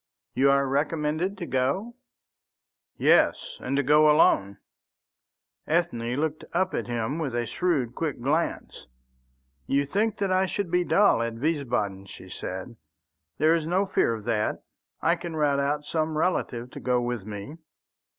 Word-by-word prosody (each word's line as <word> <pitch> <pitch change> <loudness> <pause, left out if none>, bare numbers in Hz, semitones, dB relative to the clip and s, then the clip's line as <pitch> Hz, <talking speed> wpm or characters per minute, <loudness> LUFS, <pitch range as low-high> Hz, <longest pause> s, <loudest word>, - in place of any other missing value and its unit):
"You 135 +2 +3
are 140 0 +3
recommended 150 +6 -1
to 180 - -5
go?" 140 - -1 1.0
"Yes, - - +3
and 140 - -2
to 140 - +2
go 150 +3 +5
alone." 100 -10 +4 1.1
Ethne 125 -8 0
looked 155 +2 -2
up 185 0 +1
at - - -2
him 120 +5 -2
with 140 -7 -3
a 120 0 0
shrewd, 145 -7 -1
quick 150 -1 -3
glance. 145 - -2 0.8
"You 140 +1 +2
think 210 +9 0
that 200 -2 -1
I 185 +1 +2
should 185 -2 -3
be 180 0 +3
dull 200 - +4
at 115 -1 -2
Wiesbaden," 120 -9 -2
she 95 - -12
said. 95 +4 -6 0.6
"There 155 +2 +4
is 165 -2 0
no 185 +4 +2
fear 115 -10 +1
of 110 - -9
that. 110 -3 -1 0.4
I 170 - +4
can 170 -1 -7
rout 145 -2 +2
out 145 +1 -1
some 155 0 -1
relative 125 -8 -1
to - - -8
go 125 -1 +1
with 120 -3 -3
me." 105 +9 -8
145 Hz, 155 wpm, -26 LUFS, 120-170 Hz, 1.1 s, go